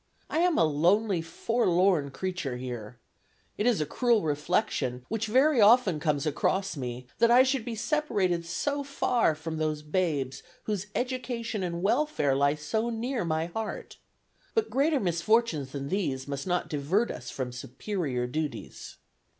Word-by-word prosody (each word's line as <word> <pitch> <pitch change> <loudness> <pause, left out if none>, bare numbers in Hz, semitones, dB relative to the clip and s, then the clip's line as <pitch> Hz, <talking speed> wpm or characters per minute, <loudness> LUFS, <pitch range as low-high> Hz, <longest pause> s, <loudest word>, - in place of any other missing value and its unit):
I 315 - +1
am 350 -1 +3
a - - +5
lonely, 175 +6 +2
forlorn 180 -3 +1
creature 165 -4 -3
here.... 125 -2 -6 0.6
It 210 - 0
is 240 -4 +3
a - - +1
cruel 235 - +2
reflection, 145 - -1
which 220 0 -1
very 260 +3 +4
often 210 -6 +5
comes 150 -2 0
across 190 +5 0
me, 125 -2 -5
that 235 0 +5
I 245 +2 +7
should 260 -2 0
be 235 -1 -4
separated 205 - 0
so 280 +12 -2
far 245 - +1
from 160 +1 -5
those 155 -1 -1
babes 150 -5 -1 0.2
whose 210 -2 -3
education 245 -4 -2
and 170 -1 -3
welfare 220 - +2
lie 140 +1 +3
so 220 +11 -2
near 235 0 -2
my 160 -1 0
heart. 215 +6 -5 0.6
But 445 -1 +1
greater 285 +2 +2
misfortunes 175 - +1
than 140 0 -5
these 140 -10 -1
must 140 +3 -4
not 180 -1 0
divert 160 +11 0
us 125 0 -7
from 130 -2 -4
superior 130 - -3
duties. 140 -1 -5
180 Hz, 150 wpm, -28 LUFS, 145-230 Hz, 0.6 s, I